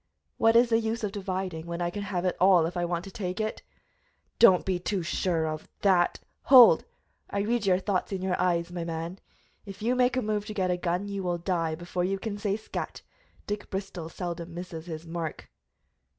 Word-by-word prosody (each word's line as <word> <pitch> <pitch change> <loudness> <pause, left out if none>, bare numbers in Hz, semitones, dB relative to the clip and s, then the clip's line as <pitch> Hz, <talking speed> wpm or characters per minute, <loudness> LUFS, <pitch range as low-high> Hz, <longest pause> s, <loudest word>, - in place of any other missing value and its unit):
"What 225 0 +4
is 235 +1 +6
the 225 - +5
use 225 +1 -2
of 205 - -1
dividing, 185 -4 -4
when 170 0 -4
I 175 0 -1
can 205 - -5
have 190 -3 -2
it 180 - +1
all 185 -3 +6
if 170 - -4
I 175 0 0
want 170 0 -2
to 195 - -9
take 185 -4 -4
it?" 215 0 -2 0.8
"Do 235 - +10
not 180 -2 +1
be 185 -2 0
too 185 0 -2
sure 165 -1 0
of 155 0 -5 0.2
that 185 -3 +3
" - - -46
"Hold! 255 -3 +9 0.4
I 200 - -1
read 220 0 0
your 180 -1 +5
thought 190 0 -1
in 190 -1 -3
your 185 -1 +1
eyes, 175 -1 +1
my 175 -1 -4
man. 165 +2 -5 0.4
If 200 0 -9
you 240 +2 +2
make 250 0 +2
a 255 - +1
move 210 -1 -1
to 215 - -6
get 185 -3 +1
a 180 - 0
gun 180 +3 -1
you 200 -1 -3
will 175 -2 -1
die 170 -2 -1
before 175 +2 -3
you 195 +2 0
can 205 +1 -5
say 205 -1 0
scat! 220 - -6 0.4
Dick 205 0 -4
Bristol 190 -4 -5
seldom 170 -1 -5
misses 175 -2 -7
his 160 -1 -6
mark." 165 -2 -5
185 Hz, 220 wpm, -28 LUFS, 175-205 Hz, 0.8 s, Do